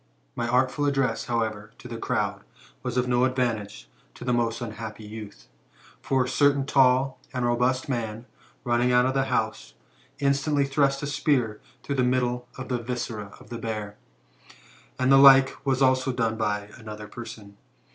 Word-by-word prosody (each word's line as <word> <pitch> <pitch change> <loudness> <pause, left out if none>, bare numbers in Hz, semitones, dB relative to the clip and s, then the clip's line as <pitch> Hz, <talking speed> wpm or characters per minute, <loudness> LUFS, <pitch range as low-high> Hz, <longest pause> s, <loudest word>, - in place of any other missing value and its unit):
My 120 - -2
artful 130 +4 +1
address, 135 -2 0
however, 110 -3 -2
to - - -11
the - - -6
crowd, - - -1 0.4
was - - -3
of 125 0 +1
no 125 0 +2
advantage 120 -5 -1 0.3
to - - -9
the 125 - +1
most 115 -1 0
unhappy 110 -2 -7
youth. 105 -1 -10 0.5
For 135 -1 +1
a - - -4
certain 140 0 +3
tall 135 -1 +3 0.2
and 125 -1 0
robust 125 +2 +1
man, 115 -3 -3 0.4
running 120 0 +2
out 125 0 +4
of 130 - +1
the 135 0 +1
house, - - -2 0.4
in 140 -1 +3
stantly 140 0 0
thrust 140 0 +1
a - - 0
spear 135 -6 0 0.2
through 140 - -3
the 130 - +3
middle 125 -1 0
of 130 0 -6
the 125 -1 0
viscera 115 -4 -4
of - - -17
the 120 - -5
bear, 105 -2 -4 1.0
and 130 +1 +2
the 135 - +8
like 135 -1 +8
was 135 0 +2
also 130 0 +3
done 115 -3 0
by 105 -2 -2
another 105 -2 -8
person. 105 -3 -10
125 Hz, 170 wpm, -26 LUFS, 115-135 Hz, 1.0 s, the